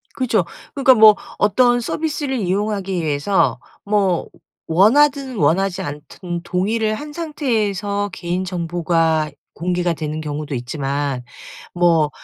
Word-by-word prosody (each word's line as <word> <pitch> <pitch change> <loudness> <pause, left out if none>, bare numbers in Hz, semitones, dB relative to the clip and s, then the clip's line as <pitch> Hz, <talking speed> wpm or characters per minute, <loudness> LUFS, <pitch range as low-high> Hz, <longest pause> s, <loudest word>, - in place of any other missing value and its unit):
그죠. 230 -8 +1 0.3
그러니까 270 -2 +5
뭐 215 -2 +8 0.2
어떤 245 +4 +3
서비스를 290 +1 -2
이용하기 195 0 -1
위해서 155 +6 +1 0.3
뭐 200 -4 +1 0.4
원하든 260 - +3
원하지 180 +2 +1
않든 170 +4 -6
동의를 215 +5 0
한 295 +6 -7
상태에서 210 - -1
개인 175 +1 -3
정보가 165 -3 0 0.2
공개가 175 +1 -1
되는 155 0 -4
경우도 150 -1 -4
있지만 135 +1 -3 0.5
뭐 170 -4 +3
185 Hz, 265 characters per minute, -20 LUFS, 160-220 Hz, 0.5 s, 뭐